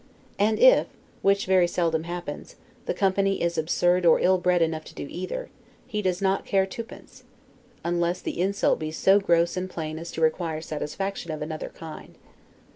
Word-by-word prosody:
And 215 Hz, +2 st, +3 dB
if -, -, +6 dB, 0.3 s
(which 200 Hz, 0 st, +3 dB
very 185 Hz, -2 st, +4 dB
seldom 165 Hz, -2 st, 0 dB
happens) 175 Hz, 0 st, -6 dB, 0.3 s
the -, -, +1 dB
company 195 Hz, 0 st, +1 dB
is 170 Hz, 0 st, 0 dB
absurd 175 Hz, +3 st, +2 dB
or 165 Hz, -2 st, +6 dB
ill 185 Hz, 0 st, +3 dB
bred 180 Hz, -1 st, +3 dB
enough 160 Hz, -1 st, -2 dB
to -, -, -13 dB
do -, -, -5 dB
either, 185 Hz, -, -5 dB, 0.3 s
he 210 Hz, -, -3 dB
does 185 Hz, -1 st, -1 dB
not 195 Hz, 0 st, +1 dB
care 195 Hz, -1 st, +2 dB
twopence, 230 Hz, +4 st, -10 dB, 0.6 s
unless 175 Hz, +1 st, 0 dB
the -, -, -4 dB
insult 200 Hz, +2 st, +1 dB
be 155 Hz, -1 st, -3 dB
so 190 Hz, +5 st, +4 dB
gross 170 Hz, -3 st, +2 dB
and 185 Hz, 0 st, -3 dB
plain 160 Hz, -2 st, -5 dB
as 170 Hz, +1 st, -7 dB
to -, -, -4 dB
require 160 Hz, 0 st, +1 dB
satisfaction 165 Hz, +4 st, -4 dB
of 155 Hz, -1 st, -3 dB
another 155 Hz, 0 st, -5 dB
kind. 160 Hz, -1 st, -11 dB
175 Hz, 175 wpm, -26 LUFS, 165-195 Hz, 0.6 s, if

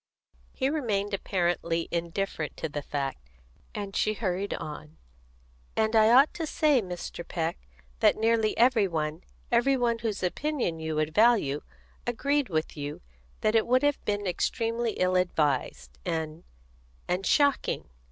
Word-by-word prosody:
He 265 Hz, -, -1 dB
remained 215 Hz, -9 st, -1 dB
apparently 175 Hz, -3 st, 0 dB
indifferent 170 Hz, -1 st, -3 dB
to -, -, -2 dB
the 145 Hz, -1 st, -4 dB
fact, 135 Hz, -, -4 dB, 0.5 s
and 200 Hz, -2 st, -5 dB
she 215 Hz, -, +1 dB
hurried 195 Hz, -2 st, -2 dB
on: 150 Hz, +1 st, -8 dB, 0.8 s
"And 220 Hz, +1 st, +2 dB
I 220 Hz, 0 st, +6 dB
ought 265 Hz, +5 st, +6 dB
to 325 Hz, -2 st, -3 dB
say, 295 Hz, -4 st, +3 dB
Mr. 180 Hz, -2 st, -6 dB
Peck, 165 Hz, -1 st, -2 dB, 0.4 s
that -, -, +5 dB
nearly 225 Hz, -1 st, +2 dB
every 235 Hz, -4 st, +4 dB
one 155 Hz, -1 st, -3 dB, 0.3 s
every 245 Hz, +3 st, +3 dB
one 235 Hz, -2 st, +1 dB
whose 215 Hz, -4 st, -3 dB
opinion 235 Hz, -, -1 dB
you 160 Hz, -1 st, -3 dB
would 155 Hz, 0 st, 0 dB
value 210 Hz, -, +4 dB, 0.5 s
agreed 280 Hz, +2 st, 0 dB
with 155 Hz, -2 st, -2 dB
you 145 Hz, -1 st, -5 dB, 0.4 s
that 215 Hz, -, +2 dB
it 225 Hz, 0 st, +3 dB
would 255 Hz, +2 st, +3 dB
have 290 Hz, -1 st, +1 dB
been 205 Hz, -1 st, -1 dB
extremely 230 Hz, +5 st, -1 dB
ill 185 Hz, 0 st, +1 dB
advised, 140 Hz, -, 0 dB
and 160 Hz, +1 st, -3 dB, 0.6 s
and 180 Hz, +2 st, 0 dB
shocking. 285 Hz, +5 st, +2 dB
195 Hz, 140 wpm, -28 LUFS, 160-235 Hz, 0.8 s, I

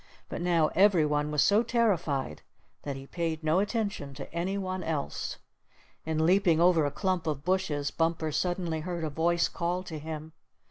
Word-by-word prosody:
But -, -, -4 dB
now 170 Hz, -3 st, +3 dB
every 190 Hz, -4 st, +4 dB
one 150 Hz, 0 st, 0 dB
was 150 Hz, -1 st, +3 dB
so 205 Hz, +2 st, +4 dB
terrified 175 Hz, -, 0 dB, 0.4 s
that 140 Hz, -2 st, -4 dB
he 135 Hz, 0 st, -8 dB
paid 165 Hz, +1 st, -3 dB
no 160 Hz, +3 st, +3 dB
attention 200 Hz, -, -2 dB
to -, -, -9 dB
any 180 Hz, +4 st, -1 dB
one 185 Hz, -1 st, -3 dB
else. 155 Hz, -4 st, -3 dB, 0.7 s
In 160 Hz, 0 st, +1 dB
leaping 175 Hz, -2 st, +4 dB
over 170 Hz, -3 st, +4 dB
a -, -, -3 dB
clump 185 Hz, 0 st, -1 dB
of 145 Hz, -3 st, -2 dB
bushes, 175 Hz, -6 st, 0 dB
Bumper 165 Hz, -1 st, 0 dB
suddenly 175 Hz, 0 st, -1 dB
heard 170 Hz, +1 st, -4 dB
a 155 Hz, -, -2 dB
voice 170 Hz, +3 st, +2 dB
call 175 Hz, +2 st, -2 dB
to 160 Hz, -4 st, -6 dB
him. 155 Hz, 0 st, -7 dB
165 Hz, 175 wpm, -29 LUFS, 155-185 Hz, 0.7 s, every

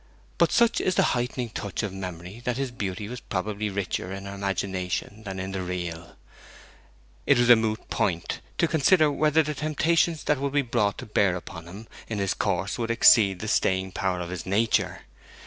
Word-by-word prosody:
But -, -, +4 dB
such 235 Hz, -1 st, +3 dB
is 185 Hz, -, 0 dB
the -, -, +4 dB
heightening 125 Hz, 0 st, -2 dB
touch 100 Hz, -1 st, -4 dB
of 105 Hz, -3 st, -3 dB
memory 90 Hz, +2 st, -7 dB
that 125 Hz, -1 st, -1 dB
his 135 Hz, -2 st, -2 dB
beauty 100 Hz, -4 st, -4 dB
was 125 Hz, +2 st, -6 dB
probably 105 Hz, 0 st, -3 dB
richer 95 Hz, -2 st, -3 dB
in 95 Hz, 0 st, -6 dB
her 100 Hz, -, -6 dB
imagination 95 Hz, +1 st, -3 dB
than 95 Hz, -1 st, -5 dB
in 95 Hz, +1 st, -4 dB
the 95 Hz, -1 st, -3 dB
real. 85 Hz, -2 st, -5 dB, 1.1 s
It 140 Hz, -, +5 dB
was 120 Hz, 0 st, +5 dB
a -, -, +11 dB
moot 110 Hz, -1 st, -2 dB
point 85 Hz, -3 st, -1 dB, 0.2 s
to 170 Hz, -, +3 dB
consider 155 Hz, 0 st, +4 dB
whether 155 Hz, +2 st, +3 dB
the 150 Hz, 0 st, -3 dB
temptations 155 Hz, +2 st, +1 dB
that 150 Hz, -3 st, +1 dB
would 140 Hz, 0 st, -2 dB
be 145 Hz, -1 st, +3 dB
brought 115 Hz, -5 st, 0 dB
to -, -, -7 dB
bear 100 Hz, -3 st, +2 dB
upon 90 Hz, -1 st, -8 dB
him 100 Hz, +6 st, -10 dB, 0.2 s
in 110 Hz, -, -2 dB
his 100 Hz, -1 st, 0 dB
course 95 Hz, +2 st, -1 dB
would 115 Hz, -1 st, -2 dB
exceed 110 Hz, -4 st, +5 dB
the 110 Hz, -, -4 dB
staying 95 Hz, -2 st, +1 dB
power 90 Hz, -1 st, -1 dB
of 85 Hz, 0 st, -5 dB
his 90 Hz, -, -5 dB
nature. 105 Hz, +3 st, +1 dB
105 Hz, 195 wpm, -26 LUFS, 95-125 Hz, 1.1 s, a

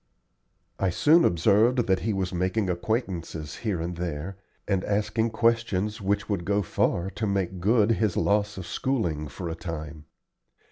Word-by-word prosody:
I 95 Hz, -, +2 dB
soon 155 Hz, -, +5 dB
observed 110 Hz, -, +3 dB
that 95 Hz, -1 st, +2 dB
he 110 Hz, -, -1 dB
was 95 Hz, -2 st, -2 dB
making 95 Hz, +2 st, 0 dB
acquaintances 85 Hz, -, -3 dB
here 105 Hz, -7 st, -2 dB
and 85 Hz, +1 st, -4 dB
there, 85 Hz, +1 st, -4 dB, 0.3 s
and 95 Hz, -2 st, +1 dB
asking 105 Hz, +2 st, 0 dB
questions 110 Hz, -3 st, 0 dB
which 100 Hz, +1 st, 0 dB
would 100 Hz, -5 st, -1 dB
go 100 Hz, +3 st, +1 dB
far 90 Hz, +1 st, 0 dB
to 110 Hz, -, -3 dB
make 95 Hz, -2 st, -1 dB
good 110 Hz, +3 st, +3 dB
his 110 Hz, -4 st, +1 dB
loss 105 Hz, 0 st, +1 dB
of 95 Hz, -, -6 dB
schooling 85 Hz, -, -1 dB
for 90 Hz, +4 st, -6 dB
a 80 Hz, -, -3 dB
time. 80 Hz, -3 st, -7 dB
100 Hz, 155 wpm, -26 LUFS, 85-110 Hz, 0.3 s, soon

